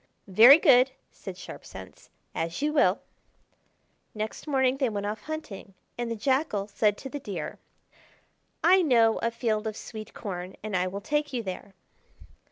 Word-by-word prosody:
"Very 230 +9 +9
good," 255 -4 +5 0.2
said - - -9
Sharp - - -10
Sense: - - -12 0.2
"as 165 +1 -3
you 300 0 +1
will." 295 - +3 1.1
Next 215 +7 -5
morning 265 -2 +2
they 265 -3 +1
went 205 -2 -4
off 210 +1 -4
hunting, 215 -10 -7 0.2
and 240 -1 -3
the 230 - -2
Jackal 260 -3 0
said 205 0 +1
to - - -8
the 290 - -5
Deer: 190 - -6 1.0
"I 370 +2 +6
know 230 -8 +3
a 230 - 0
field 225 -2 -2
of 215 - -5
sweet 215 -2 -9
corn, 185 -2 -6
and 215 -2 -3
I 180 0 +1
will 195 +2 -5
take 295 +3 -1
you 240 -2 -2
there." 190 0 -7
225 Hz, 165 wpm, -27 LUFS, 200-265 Hz, 1.1 s, Very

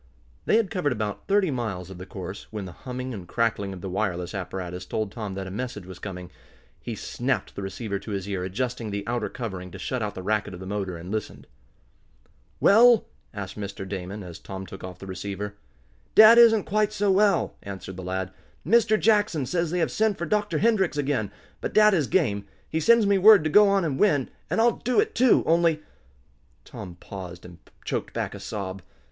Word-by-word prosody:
They - - +3
had 225 -5 0
covered 160 -8 0
about 105 -3 -4
thirty 195 -4 +3
miles 100 -8 -4
of 90 - -10
the 95 - -8
course, 95 +1 -7
when 105 -3 -5
the 90 - -8
humming 125 +5 -6
and 95 -5 -8
crackling 115 -2 0
of 95 -2 -8
the 95 - -5
wireless 90 -2 -2
apparatus 90 -2 -5
told 105 +2 -3
Tom 105 -4 -5
that 95 0 -4
a 95 - -7
message 105 -2 -5
was 95 -1 -10
coming. 90 -3 -7 0.5
He - - -5
snapped - - -2
the - - -5
receiver 100 +1 -4
to 100 - -10
his 100 -2 -3
ear, 95 -3 -2
adjusting 115 +4 -3
the 100 0 -3
outer 120 +1 -2
covering 95 -7 -6
to 95 - -10
shut 125 +6 -3
out 105 -1 -3
the 95 - -6
racket 105 -1 -1
of - - -10
the 95 - -8
motor, 95 -2 -3
and 85 +3 -8
listened. 110 -1 -4 1.1
"Well?" 230 +3 +6 0.3
asked 100 -1 -7
Mr. 100 -1 -6
Damon, 95 +1 -5
as 85 -2 -9
Tom 95 -1 -7
took 95 - -10
off 90 -1 -7
the - - -10
receiver. 100 +2 -5 0.6
"Dad 220 +2 +9
isn't 225 -3 +7
quite 215 0 +1
so 205 -1 +1
well," 200 +1 +3
answered 95 -1 -7
the 95 - -7
lad. 95 +1 -3 0.3
"Mr. 215 +3 +4
Jackson 205 -10 +2
says 170 +5 -1
they 180 - -1
have 165 -2 +1
sent 215 -2 +1
for 170 - -3
Dr. 210 +4 0
Hendrix 205 -9 +2
again. 135 -8 0 0.3
But - - -3
dad 215 -1 +7
is 155 -8 +2
game. 105 - +1 0.2
He 160 - -1
sends 230 +6 +5
me 200 -1 +3
word 210 -2 +8
to 155 - -1
go 205 +3 +7
on 195 -3 +2
and 135 -4 -2
win, 145 -11 +2 0.2
and - - 0
I'll 235 +1 +3
do 250 - +1
it, 435 0 +1
too, 255 -1 +4
only 165 -2 +2 0.4
" - - -37
Tom 90 - -9
paused, 90 -1 -9
and 90 -1 -12 0.3
choked - - -3
back - - -2
a - - -8
sob. 95 -2 -5
110 Hz, 210 wpm, -25 LUFS, -, 1.1 s, Dad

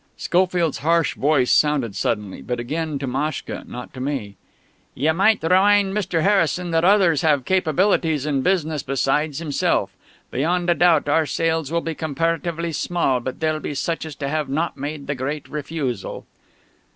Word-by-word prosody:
Schofield's 175 -6 +1
harsh 165 +4 +2
voice 135 -3 +2
sounded 140 -9 +2
suddenly 105 -1 -2
but 125 -1 -3
again 155 +5 -3
to 140 - -4
Maschka, 135 +3 -3
not 125 0 -8
to 130 - -9
me. 130 -7 -3 0.6
"Ye 150 +5 +2
might 195 +5 +3
remind 195 +3 +4
Mr. 180 -6 -1
Harrison 180 -3 +2
that 165 0 +2
others 185 -6 +4
have 145 -5 +2
capabilities 165 -4 +1
in 140 -3 0
business 160 -4 0
besides 135 +3 0
himself. 155 -4 0 0.4
Beyond 175 +6 +1
a - - +5
doubt 170 -4 +3
our 155 +1 +2
sales 160 -2 -1
will 170 0 +1
be 165 - -3
comparatively 165 +2 -2
small, 160 -5 0
but 130 +1 -6
they'll 155 -1 0
be - - -5
to - - -9
such 165 +4 -2
as 150 - -9
have 145 0 -2
not 160 +5 -1
made 145 +1 -5
the 140 - -2
great 140 +3 -4
refusal." 150 -4 -4
155 Hz, 165 wpm, -22 LUFS, 140-170 Hz, 0.6 s, a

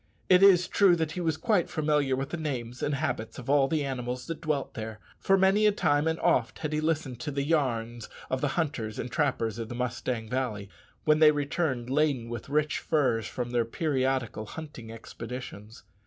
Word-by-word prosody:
It 180 0 +7
is 185 -3 +6
true 190 -4 +4
he 160 +2 -2
was 160 -2 0
quite 205 -4 +1
familiar 150 -3 +1
with 135 +1 -4
the 175 - -2
names 130 -6 -4
and 145 - 0
habits 130 -6 -3
of 130 +1 -3
all 140 -2 +4
the 150 -1 0
animals 125 -2 -4
that 165 -2 -6
dwelt 150 -4 -2
there; 110 -1 -6 0.2
for 195 - +3
many 195 +3 +4
a - - +5
time 145 -6 +1
and 160 0 0
oft - - +2
had 155 -1 -4
he 150 - 0
listened 155 -6 -1
to 150 - -4
the 140 -1 -1
"yarns" 120 -7 -1 0.2
of 130 0 -2
the 145 - +2
hunters 130 -10 -2
and 125 - -4
trappers 125 -7 0
of 115 -1 -5
the 120 - -5
Mustang 120 -2 -3
Valley, 110 -5 -3 0.4
when 155 0 +4
they 155 -1 +8
returned 145 -4 -1
laden 140 -5 +1
with 120 +2 -6
rich 150 +2 +1
furs 125 -8 +1
from 120 -1 -4
their 120 -1 +2
periodical 130 -4 -1
hunting 135 -6 -8
expeditions. 115 -1 -8
140 Hz, 195 wpm, -28 LUFS, 120-155 Hz, 0.4 s, they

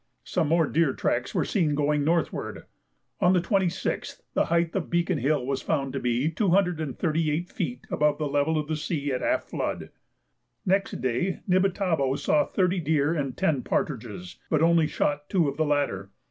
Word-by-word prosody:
Some 170 -4 0
more 165 +1 +3
deer 155 -2 +1
tracks 120 0 -1
were - - +2
seen 160 -8 +1
going 145 0 +1
northward. 165 +2 -1 0.6
On 180 - +4
the 180 - +4
26th 185 0 -1
the - - +2
height 170 0 +1
of 190 - -2
Beacon 175 -1 +1
Hill 140 -2 +1
was 135 0 -2
found 135 -4 -1
to - - -2
be 125 +3 0
238 165 - 0
feet 125 - -4
above 150 -1 +2
the 150 - -1
level 145 +3 +1
of 150 -1 -2
the 160 - -1
sea 150 -2 -2
at 130 - -1
half - - +1
flood. - - -4 0.7
Next 195 -5 0
day 130 +9 -1
Nibitabo 180 -7 +2
saw 150 - +2
thirty 185 -1 +1
deer 155 -1 +1
and 140 -6 -3
ten 160 -8 +1
partridges, 110 - -3
but 155 0 +2
only 165 -1 +4
shot 145 -1 -1
two 175 -6 +2
of 140 - -2
the 160 - +2
latter. 140 -10 0
155 Hz, 175 wpm, -26 LUFS, 140-170 Hz, 0.7 s, On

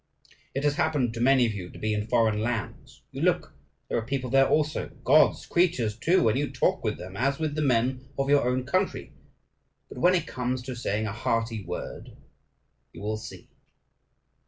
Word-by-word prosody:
It 135 - -1
has 145 -1 +1
happened 140 -6 +1
to 115 - -6
many 130 0 +5
of 110 - -1
you 90 -3 -6
to - - -12
be 110 0 -1
in 105 0 -2
foreign 115 -3 +2
lands. 115 -1 -4
You - - -6
look: - - +1 0.3
there - - 0
are - - -4
people 130 +1 -3
there 135 0 +5
also, 155 0 0
God's - - +4
creatures, 160 - +1
too; 170 +8 +2
and 110 +4 +2
you 145 - -1
talk 130 - 0
with 110 -2 -1
them 95 +1 -9
as 135 +5 0
with 155 -2 -2
the 155 - -2
men 130 -1 +1
of 135 0 0
your 140 -3 +3
own 130 0 0
country. 185 +8 -1 0.8
But - - -9
when 180 +1 +5
it 170 -3 0
comes 125 -2 -3
to 130 0 -6
saying 110 -2 -2
a 100 - -3
hearty 115 -1 -1
word 90 0 -7 0.8
you - - -11
will 110 +1 -2
see. 110 - -10
125 Hz, 195 wpm, -27 LUFS, 110-140 Hz, 0.8 s, many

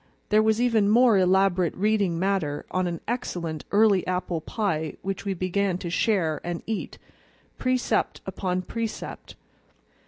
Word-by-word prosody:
There 215 +1 +5
was 220 0 +2
even 230 -4 +3
more 230 -2 +5
elaborate 185 -2 +3
reading 200 -3 +1
matter 180 -6 -1
on 185 0 0
an 170 -2 -4
excellent 175 - -3
early 205 -2 +5
apple 180 -2 -2
pie 160 -7 -2
which 195 +1 -4
we 195 -1 -1
began 185 +1 0
to 175 -2 -5
share 180 -6 +1
and 175 -1 -4
eat, 220 -2 -4 0.6
precept 255 -1 0
upon 185 -1 -2
precept. 230 +2 -5
190 Hz, 135 wpm, -25 LUFS, 175-215 Hz, 0.6 s, There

